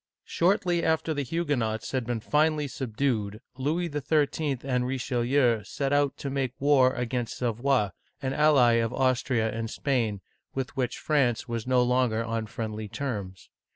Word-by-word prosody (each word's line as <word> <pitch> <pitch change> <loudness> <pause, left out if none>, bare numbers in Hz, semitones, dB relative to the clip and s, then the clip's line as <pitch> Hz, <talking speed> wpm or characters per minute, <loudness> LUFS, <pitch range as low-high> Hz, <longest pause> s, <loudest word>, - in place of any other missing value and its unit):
Shortly 175 -1 +1
after 160 0 +1
the 145 - -2
Huguenots 130 -8 -1
had 130 -4 -2
been 120 -2 -2
finally 150 +2 +2
subdued, 115 -5 -2 0.2
Louis 155 +7 -1
XIII. 145 -1 0
and 125 -2 0
Richelieu 125 -2 +1
set 140 +5 -2
out 145 -1 +2
to 140 - -4
make 135 -3 -1
war 135 -2 +5
against 120 -1 -2
Savoy, 120 -1 +1 0.3
an 135 -2 -2
ally 135 -6 +5
of 115 0 -1
Austria 130 -3 +1
and 115 0 -3
Spain, 115 -7 -1 0.3
with 135 0 -3
which 130 -3 -1
France 135 -7 +1
was 115 -1 -4
no 125 -1 +4
longer 125 -2 +1
on 115 -1 -2
friendly 110 -1 -5
terms. 100 -7 -5
130 Hz, 150 wpm, -27 LUFS, 115-145 Hz, 0.3 s, war